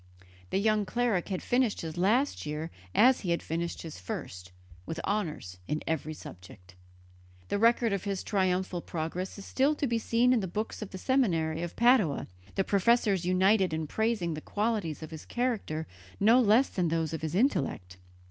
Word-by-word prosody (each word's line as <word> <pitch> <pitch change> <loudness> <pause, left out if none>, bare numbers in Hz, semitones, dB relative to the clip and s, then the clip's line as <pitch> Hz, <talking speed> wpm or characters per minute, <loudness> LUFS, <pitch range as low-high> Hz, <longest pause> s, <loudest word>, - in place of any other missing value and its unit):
The - - 0
young 215 +1 +2
cleric 235 -7 0
had 185 -2 -3
finished 245 -3 +1
his 160 -1 -5
last 220 +11 +1
year 150 +2 -4 0.2
as 255 +3 +6
he 185 - -4
had 170 - 0
finished 170 +1 -3
his 160 - -8
first, 90 0 -7 0.3
with 160 - -5
honours 155 - -3
in 150 - -2
every 155 -1 -2
subject. 90 -4 -12 0.8
The - - 0
record 230 -1 +3
of 200 - -2
his 195 -2 -2
triumphal 185 -3 0
progress 170 +5 -4
is 200 - -9
still 280 +3 +2
to 290 - -1
be 235 -3 0
seen 235 +3 +3
in 245 - +3
the 190 - -2
books 210 +6 -4
of 210 - -5
the 190 - -7
seminary 170 -10 +1
of 175 -1 -5
Padua, 235 - +3 0.3
the 195 - +2
professors 200 -2 +2
united 190 0 +3
in 160 0 -2
praising 215 -1 -1
the 155 - -6
qualities 205 -8 -2
of 155 - -8
his 160 -1 -8
character 225 -11 -2 0.3
no 225 +5 +6
less 230 +4 +4
than 180 -2 0
those 165 -1 -1
of 160 - -4
his 160 +1 -3
intellect. 135 - 0
190 Hz, 180 wpm, -29 LUFS, 160-225 Hz, 0.8 s, as